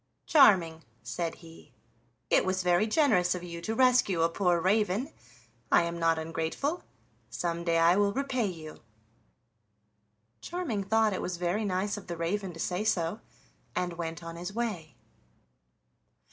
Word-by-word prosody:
"Charming," 180 - +5 0.2
said 140 +9 -3
he, 165 0 -15 0.6
"it - - +5
was 185 0 -1
very 180 +4 +3
generous 215 - +3
of 180 - -6
you 170 -1 -7
to 220 +6 -3
rescue 245 -9 +3
a 165 - +3
poor 175 0 +1
raven; 205 +6 +1 0.6
I - - +5
am 170 0 -4
not 165 -1 +2
ungrateful, 165 - -3 0.5
some 170 -1 -3
day 170 -1 +1
I 165 +2 +5
will 205 0 +3
repay 260 -2 -1
you." 160 -4 -8 1.6
Charming 305 - -3
thought 220 0 +2
it - - -3
was 180 -1 -3
very 180 +5 -1
nice 200 +2 -1
of 205 - -10
the 170 -1 -5
raven 185 +3 -2
to 165 - -11
say 180 +4 -1
so, 180 -1 0 0.6
and 180 -1 -1
went 165 0 -5
on 165 0 -7
his 175 +3 -5
way. 210 -9 -4
180 Hz, 150 wpm, -29 LUFS, 170-210 Hz, 1.6 s, Charming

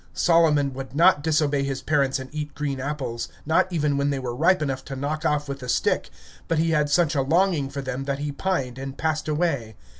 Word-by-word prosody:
Solomon 155 -5 +3
would 135 0 -7
not 170 -1 +5
disobey 150 -2 +1
his 135 -1 -3
parents 140 -3 +1
and 130 -1 -7
eat 150 -1 -5
green 140 -2 -3
apples, 130 -4 -3 0.2
not 165 +4 +2
even 150 -4 +1
when 140 0 +1
they 140 - -1
were 125 -2 -4
ripe 175 +7 +3
enough 135 -2 -3
to 135 - -6
knock 150 +4 -3
off 150 -1 +1
with 140 0 -5
a 125 - -6
stick, - - +1 0.4
but 165 - 0
he 165 +1 +2
had 150 -2 +2
such 170 +1 +3
a 140 - +1
longing 160 0 +2
for 140 0 -5
them, 130 +1 -4
that 140 0 -1
he 145 +1 -3
pined, 140 -6 -2
and 135 0 -6
passed 155 -1 -1
away. 150 -8 -1
145 Hz, 220 wpm, -24 LUFS, 135-155 Hz, 0.4 s, not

